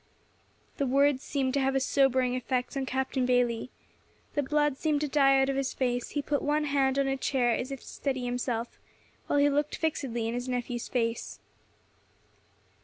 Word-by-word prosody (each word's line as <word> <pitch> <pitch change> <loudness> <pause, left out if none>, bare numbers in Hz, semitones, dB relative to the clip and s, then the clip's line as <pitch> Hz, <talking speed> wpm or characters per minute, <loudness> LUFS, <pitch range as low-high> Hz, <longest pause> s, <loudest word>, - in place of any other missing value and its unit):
The 280 - 0
words 275 +1 +3
seemed 270 -3 -1
to 280 - +2
have 270 0 +1
a - - +4
sobering 260 -2 +2
effect 255 +1 -2
on 270 -1 -2
Captain 265 0 -1
Bayley. 245 -1 +1 0.6
The 290 - +1
blood 295 0 +1
seemed 300 +1 0
to 300 - 0
die 275 -1 +4
out 270 - +3
of 275 - 0
his 270 -1 -2
face; 245 -2 -1
he 290 - 0
put 285 0 0
one 295 +1 +1
hand 275 -2 +1
on 275 - +2
a 270 0 0
chair, 260 -2 +1
as 250 +3 -2
if 275 - -6
to - - -16
steady 260 -3 -3
himself, 245 -1 -3 0.5
while - - +1
he 285 0 +5
looked 290 +1 0
fixedly 255 -8 -2
in 230 - -2
his 245 +1 -3
nephew's 245 -1 -3
face. 230 -2 -2
265 Hz, 185 wpm, -29 LUFS, 250-280 Hz, 0.6 s, he